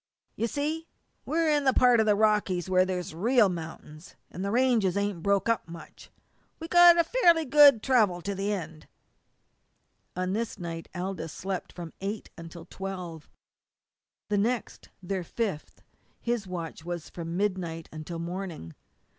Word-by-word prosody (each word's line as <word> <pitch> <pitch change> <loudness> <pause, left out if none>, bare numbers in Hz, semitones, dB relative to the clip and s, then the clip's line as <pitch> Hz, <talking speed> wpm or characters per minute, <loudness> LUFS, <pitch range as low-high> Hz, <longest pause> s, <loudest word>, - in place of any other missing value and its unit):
"You 230 - -1
see 310 +6 -3 0.4
we're 325 +1 +1
in 295 -2 +2
that 265 - +3
part 245 -2 +5
of 220 - +2
the 210 - +4
Rockies 205 -4 +1
where 185 0 +3
there's 180 -3 -4
real 220 +5 +3
mount'ins, 160 0 -8 0.2
an' 180 - -7
the 200 - -2
ranges 230 -5 +2
ain't 200 -4 -1
broke 200 +2 +1
up 230 -6 0
much. 170 0 -12 0.5
We've 325 +1 -8
got 345 -1 +7
fairly 340 -7 +3
good 280 -4 +7
travel 215 -9 +3
to 200 - -2
the 195 +2 -2
end." 165 -6 -6 1.3
On 185 +1 -2
this 225 +1 -3
night 165 -3 -6
Aldous 180 -3 -4
slept 190 +2 -5
from 170 -2 -9
eight 205 +2 -5
until 165 0 -10
twelve. 180 -4 -7 1.0
The 205 -1 +1
next, 235 +2 -2
their 185 0 -3
fifth, 195 -3 -4 0.4
his 235 -4 -2
watch 170 -3 -6
was 175 -1 -6
from 170 0 -5
midnight 180 -5 -2
until 155 +2 -7
morning. 170 - -6
195 Hz, 150 wpm, -28 LUFS, 170-230 Hz, 1.3 s, got